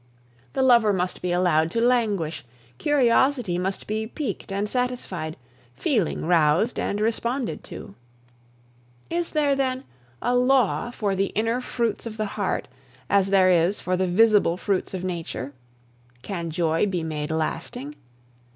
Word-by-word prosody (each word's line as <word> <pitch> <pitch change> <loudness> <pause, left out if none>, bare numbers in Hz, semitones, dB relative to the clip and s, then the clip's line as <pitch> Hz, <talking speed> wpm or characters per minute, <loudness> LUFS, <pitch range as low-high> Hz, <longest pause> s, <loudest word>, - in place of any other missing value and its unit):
The 265 - +1
lover 235 -5 +5
must 180 -1 -2
be 180 - -1
allowed 175 -3 +2
to 230 - -1
languish, 210 - +1 0.4
curiosity 255 -7 +2
must 190 +2 -3
be 220 +1 -2
piqued 230 -6 -5
and 200 +2 -1
satisfied, 240 -10 -3 0.4
feeling 195 - 0
roused 165 +6 +3
and 200 - -1
responded 235 +3 -1
to. - - -9 1.2
Is 340 0 -1
there, 290 -3 +2
then, 260 -1 -1 0.4
a 245 - 0
law 250 -2 +3
for 205 -5 -1
the 195 +1 +1
inner 225 +4 +1
fruits 235 -2 -2
of 220 -1 -7
the 215 - -1
heart, 200 -3 -2 0.4
as 195 -1 +3
there 190 -1 +5
is 175 +3 +2
for 185 - -1
the 185 0 0
visible 205 -2 +4
fruits 190 0 -1
of 185 - -5
nature? 165 -6 -4 0.7
Can 170 0 -4
joy 165 +3 +1
be 180 -4 -2
made 150 -2 -3
lasting? 155 -3 -3
200 Hz, 140 wpm, -24 LUFS, 175-240 Hz, 1.2 s, lover